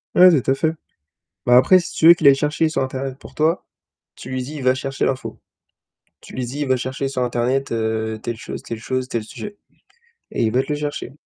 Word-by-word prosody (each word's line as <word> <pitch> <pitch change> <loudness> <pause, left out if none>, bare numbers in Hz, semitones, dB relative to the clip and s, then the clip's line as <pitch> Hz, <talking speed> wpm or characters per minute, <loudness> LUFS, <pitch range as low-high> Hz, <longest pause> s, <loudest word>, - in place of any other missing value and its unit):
Ouais, 185 +1 +9
tout - - 0
à - - +5
fait. 160 +3 0 0.7
Bah, 125 - +5
après, 185 +9 +6
si 175 - -7
tu 160 - +4
veux 170 - +11
qu'il 160 -4 +2
aille 135 - +8
chercher 150 +3 0
sur 155 - -1
internet 130 0 -4
pour - - -14
toi, 160 +3 +1 0.5
tu - - -10
lui 130 -1 -2
dis, 145 +5 -8
il 140 - -6
va 130 0 +3
chercher 135 +1 -2
l'info. 130 -1 -3 0.8
Tu - - -14
lui 125 -1 -2
dis, 135 +5 -6
il 145 - -1
va 130 -1 +2
chercher 130 +2 -3
sur 130 -2 -2
internet, 125 +3 -1
heu, 110 -1 -2
telle 120 0 -4
chose, - - -7
telle 115 - -6
chose, 130 +3 -3
tel 115 - -2
sujet 205 - -9 0.8
et - - 0
il 110 - +1
va 130 +3 +2
te - - -13
le - - +1
chercher. 145 -4 -4
130 Hz, 235 wpm, -21 LUFS, 125-145 Hz, 0.8 s, veux